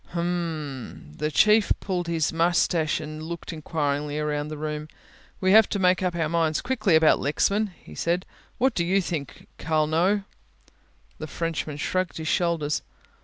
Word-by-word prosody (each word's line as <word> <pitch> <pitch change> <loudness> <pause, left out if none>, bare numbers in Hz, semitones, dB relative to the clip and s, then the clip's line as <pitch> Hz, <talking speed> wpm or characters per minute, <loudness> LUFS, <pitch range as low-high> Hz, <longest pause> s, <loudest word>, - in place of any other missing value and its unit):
"H'm," 160 - -4
the 150 - -1
Chief 215 +7 +4
pulled 180 -3 -3
at - - -1
his 160 -1 0
moustache 165 -1 +2
and 155 0 -7
looked 170 +1 -6
enquiringly 150 -2 -2
round 150 0 -2
the 155 - -6
room, 150 0 -4 0.5
"we 185 0 +2
have 220 +1 +7
to - - -1
make 185 -1 +3
up 180 -2 -1
our 165 -2 0
minds 160 -1 +1
very 245 - -10
quickly 215 -10 +3
about 160 0 +5
Lexman," 200 +9 +1 0.2
he - - -12
said. 175 +2 -1 0.3
"What 260 +2 +2
do 170 - 0
you 185 +3 +2
think, 165 -6 -5
Carlneau?" 160 +6 +1 1.0
The - - -5
Frenchman 160 -3 -3
shrugged 185 +4 -1
his 160 0 -5
shoulders. 165 -4 0
165 Hz, 165 wpm, -25 LUFS, 150-180 Hz, 1.0 s, have